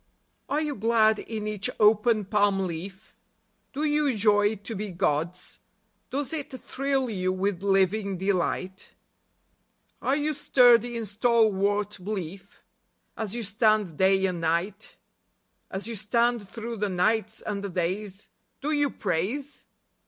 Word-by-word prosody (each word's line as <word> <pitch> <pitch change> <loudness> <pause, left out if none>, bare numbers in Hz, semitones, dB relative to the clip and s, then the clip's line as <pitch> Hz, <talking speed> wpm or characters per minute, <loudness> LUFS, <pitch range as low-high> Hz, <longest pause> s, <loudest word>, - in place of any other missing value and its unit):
Are 295 - +1
you 300 -2 -1
glad 220 0 +3
in 220 -2 -5
each 215 +3 -2
open 215 0 +4
palm 205 -1 +2
leaf? 190 +3 -6 0.6
Do 290 +3 -3
you 295 -5 +1
joy 205 0 +3
to 205 +3 -7
be 205 +1 -4
God's? 175 +1 -2 0.5
Does 280 +3 -2
it 300 -3 -3
thrill 270 -1 -1
you 185 -5 -1
with 185 0 -1
living 195 0 +1
delight? 190 0 -2 1.1
Are 270 - +1
you 300 +1 0
sturdy 245 -4 +4
in 230 - -3
stalwart 210 -2 +1
belief? 195 -1 -6 0.5
As 220 -1 -4
you 240 - -2
stand 215 -4 +2
day 190 0 +4
and 180 -3 -2
night, 175 +6 -2 0.7
As 190 +1 -5
you 230 - -4
stand 230 0 0
through 230 0 -6
the 210 0 -1
nights 215 +4 0
and 200 -1 -3
the 200 - -3
days, 190 +3 -3 0.3
Do 295 +2 -2
you 290 -2 +2
praise 260 - -3
210 Hz, 135 wpm, -26 LUFS, 190-235 Hz, 1.1 s, open